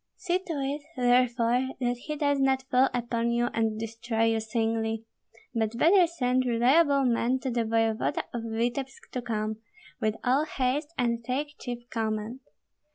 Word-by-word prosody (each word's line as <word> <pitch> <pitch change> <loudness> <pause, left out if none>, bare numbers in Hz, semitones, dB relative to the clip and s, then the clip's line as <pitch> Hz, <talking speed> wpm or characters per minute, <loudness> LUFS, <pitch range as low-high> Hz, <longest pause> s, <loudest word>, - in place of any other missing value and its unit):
See 370 -1 0
to 335 - -2
it, 285 0 -2 0.2
therefore, 245 +1 +2
that 245 -1 0
he 300 +5 -5
does 285 -2 +1
not 265 -1 +2
fall 255 +1 +5
upon 235 -1 -1
you 240 0 +1
and 220 -1 0
destroy 225 0 -2
you 225 - 0
singly. 225 0 -1 0.5
But 225 -1 -1
better 350 +5 +5
send 255 -6 +1
reliable 270 +4 +4
men 245 +1 +2
to 260 - -2
the 235 -1 0
voevoda 225 0 +1
of 240 - -2
Vityebsk 240 +4 -3
to 250 - -3
come, 215 -2 -2 0.4
with 215 -2 0
all 265 +4 +3
haste 285 +2 -1
and 235 -1 0
take 280 +5 -2
chief 240 -1 -6
command. 220 +2 -2
245 Hz, 160 wpm, -28 LUFS, 225-265 Hz, 0.5 s, fall